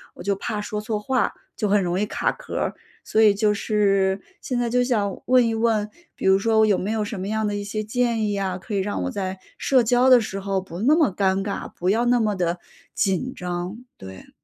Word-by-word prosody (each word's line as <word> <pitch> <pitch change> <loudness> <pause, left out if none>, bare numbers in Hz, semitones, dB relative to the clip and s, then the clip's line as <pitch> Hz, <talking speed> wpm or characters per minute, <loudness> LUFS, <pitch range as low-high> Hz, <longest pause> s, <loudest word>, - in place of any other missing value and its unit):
我 - - -10
就 200 0 0
怕 210 0 -3
说 210 0 -4
错 215 0 -2
话， 255 +3 0 0.2
就 210 - 0
很 200 0 +3
容 180 +1 -1
易 210 - +1
卡 - - -1
壳 - - -9
儿。 - - -1 0.3
所 220 - +1
以 210 -2 +6
就 210 0 +2
是 195 -2 +1 0.2
现 250 -3 -3
在 240 - 0
就 250 +1 +2
想 210 -6 -1
问 250 -1 +4
一 225 - 0
问， 220 -2 +1 0.3
比 - - -6
如 190 0 +6
说 220 +1 +3
有 205 -3 +3
没 205 +3 -2
有 220 -1 0
什 205 -1 -5
么 190 - -4
样 220 0 -1
的 205 - -1
一 205 - -3
些 215 +1 -3
建 230 0 0
议 205 - -1
呀， 190 -2 -2
可 195 +3 -8
以 200 - +1
让 190 - -2
我 90 - -2
在 190 -1 -4 0.2
社 260 -3 +3
交 245 +3 +3
的 255 - +8
时 195 -2 -4
候 195 0 -1
不 180 -1 -9
那 280 +8 +4
么 310 - +3
尴 195 -1 +1
尬， 200 - -4
不 180 - -1
要 225 +4 +2
那 245 0 +3
么 215 -3 +1
地 175 -1 -1 0.4
紧 200 +7 0
张， 180 +3 -4 0.2
对。 95 0 -11
210 Hz, 260 characters per minute, -23 LUFS, 195-225 Hz, 0.4 s, 的